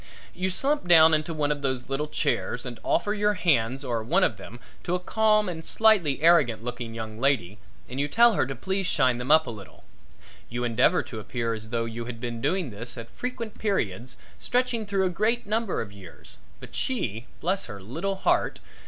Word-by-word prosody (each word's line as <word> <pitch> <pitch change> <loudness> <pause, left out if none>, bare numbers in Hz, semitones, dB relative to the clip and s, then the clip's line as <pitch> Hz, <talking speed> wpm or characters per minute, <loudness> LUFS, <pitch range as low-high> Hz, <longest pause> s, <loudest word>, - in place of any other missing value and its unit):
You 185 +1 -1
slump 275 +4 0
down 160 -2 +7
into 155 +2 +1
one 150 -2 0
of 145 -1 -2
those 130 -3 -2
little 135 +3 -2
chairs 120 -5 -1
and 120 -2 -7
offer 205 - +1
your 210 0 +1
hands 135 - +1
or 120 -3 -1
one 175 +12 +2
of - - +1
them 120 - -10 0.2
to 175 - -1
a - - -1
calm 215 +2 +2
and 165 -3 -5
slightly 175 -10 +3
arrogant 160 -10 +4
looking 120 -2 -5
young 110 -1 -6
lady 110 -7 0 0.3
and 130 +2 -6
you 145 - +1
tell 235 +8 +5
her 165 - +1
to 135 - -4
please 190 +8 -2
shine 130 -8 +2
them 125 - -5
up 160 +1 +6
a - - -5
little. 100 -4 -12 0.7
You 120 +1 -3
endeavor 120 +9 +3
to 110 - -8
appear 115 +1 -2
as 110 0 -6
though 115 0 -1
you 115 +1 -5
had 120 -1 -7
been 120 -1 -5
doing 180 -5 0
this 115 +5 -5
at 115 -1 -8
frequent 235 -3 -6
periods 125 - -2 0.2
stretching 245 -3 0
through 195 -1 +1
a - - +2
great 220 +7 0
number 215 0 -1
of 100 -3 -7
years, 95 -4 -12 0.2
but - - -12
she 120 - -2
bless 190 +3 -1
her 105 -3 -8
little 165 - -3
heart! 190 - +1
145 Hz, 205 wpm, -26 LUFS, 115-190 Hz, 0.7 s, down